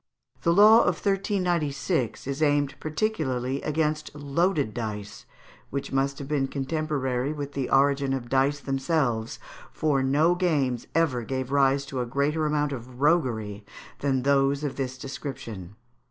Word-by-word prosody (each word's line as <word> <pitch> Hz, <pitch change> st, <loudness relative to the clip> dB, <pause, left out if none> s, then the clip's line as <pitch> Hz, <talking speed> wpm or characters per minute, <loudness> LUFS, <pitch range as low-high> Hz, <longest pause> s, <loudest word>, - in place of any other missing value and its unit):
The 170 Hz, -, +2 dB
law 210 Hz, +5 st, +8 dB
of 180 Hz, -, +2 dB
1396 175 Hz, -, -1 dB
is 140 Hz, +2 st, -4 dB
aimed 145 Hz, -2 st, +2 dB
particularly 150 Hz, -, -1 dB
against 150 Hz, 0 st, -1 dB
loaded 145 Hz, -, 0 dB
dice, 105 Hz, -3 st, -6 dB, 0.4 s
which 140 Hz, 0 st, -4 dB
must 135 Hz, 0 st, 0 dB
have 140 Hz, -, -7 dB
been 140 Hz, -2 st, 0 dB
contemporary 135 Hz, -2 st, -2 dB
with 145 Hz, -1 st, -6 dB
the 135 Hz, -2 st, -2 dB
origin 140 Hz, 0 st, +3 dB
of 130 Hz, -3 st, -2 dB
dice 135 Hz, +3 st, +2 dB
themselves, 135 Hz, -5 st, -1 dB, 0.3 s
for 145 Hz, -3 st, +1 dB
no 145 Hz, +6 st, +3 dB
games 150 Hz, -9 st, 0 dB
ever 155 Hz, -7 st, +2 dB
gave 130 Hz, +2 st, -4 dB
rise 140 Hz, 0 st, +3 dB
to 135 Hz, -2 st, -3 dB
a 120 Hz, -, -3 dB
greater 150 Hz, +5 st, 0 dB
amount 150 Hz, -1 st, 0 dB
of 125 Hz, -1 st, -8 dB
roguery 120 Hz, -10 st, +1 dB, 0.4 s
than 135 Hz, -3 st, 0 dB
those 140 Hz, +1 st, +2 dB
of 145 Hz, -, -2 dB
this 130 Hz, -1 st, -3 dB
description. 125 Hz, -, -7 dB
140 Hz, 140 wpm, -26 LUFS, 130-155 Hz, 0.4 s, law